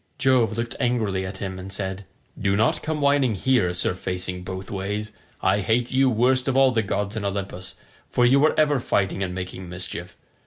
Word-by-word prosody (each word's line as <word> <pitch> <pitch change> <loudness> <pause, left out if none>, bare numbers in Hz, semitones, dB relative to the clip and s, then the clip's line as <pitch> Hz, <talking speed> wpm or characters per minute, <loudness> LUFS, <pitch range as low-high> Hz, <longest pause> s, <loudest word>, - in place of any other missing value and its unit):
Jove 125 -4 +3
looked 120 +1 -3
angrily 110 -7 0
at 95 +1 -7
him 95 -2 -5
and 95 +1 -8
said, 95 0 -4 0.3
"Do 100 -1 0
not 110 +4 +2
come 155 -1 -2
whining 140 -5 +3
here, 120 -4 +2
Sir 90 0 +1
Facing 90 0 -4
both 95 +1 -6
ways. 105 +2 -3 0.3
I 105 - +3
hate 115 +4 +1
you 130 0 +4
worst 125 +2 +2
of 135 0 +1
all 135 -1 +6
the 115 -3 +2
gods 105 0 -2
in 110 - -3
Olympus, 100 -2 -4 0.3
for 120 - +3
you 135 +3 +5
are 155 - +2
ever 150 -3 +3
fighting 95 -5 0
and 90 -1 -2
making 90 0 -6
mischief. 90 +1 -6
105 Hz, 195 wpm, -24 LUFS, 95-125 Hz, 0.3 s, all